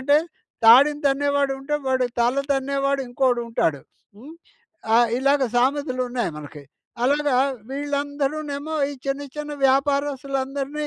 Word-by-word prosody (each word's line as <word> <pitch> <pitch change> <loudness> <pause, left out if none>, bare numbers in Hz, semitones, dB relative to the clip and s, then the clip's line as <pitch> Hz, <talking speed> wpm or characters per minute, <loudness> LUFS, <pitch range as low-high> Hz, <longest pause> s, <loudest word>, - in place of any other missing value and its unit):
అంటే 285 +3 +3 0.5
తాడిని 285 +6 +7
తన్నేవాడుంటే, 280 0 0
వాడి 260 -1 +1
తల 245 +3 +2 0.2
తన్నేవాడు 275 0 0
ఇంకోడు 245 -1 +1
ఉంటాడు. 160 -11 0 0.4
హ్మ్. 285 +9 -12 0.6
ఆహ్, 235 -1 +4
ఇలాగ 275 +1 +2
సామెతలు 255 +1 +1
ఉన్నాయి 240 -8 -2
మనకి. 150 0 -10 0.4
అలాగా 285 -1 +2 0.3
వీళ్ళందరూనేమో 285 +1 -3 0.2
ఈ - - -6
చిన్న 275 +1 -2
చిన్న 300 0 -5 0.2
వ్యాపారస్తులందరిని 275 +1 -1
275 Hz, 110 wpm, -23 LUFS, 260-285 Hz, 0.6 s, తాడిని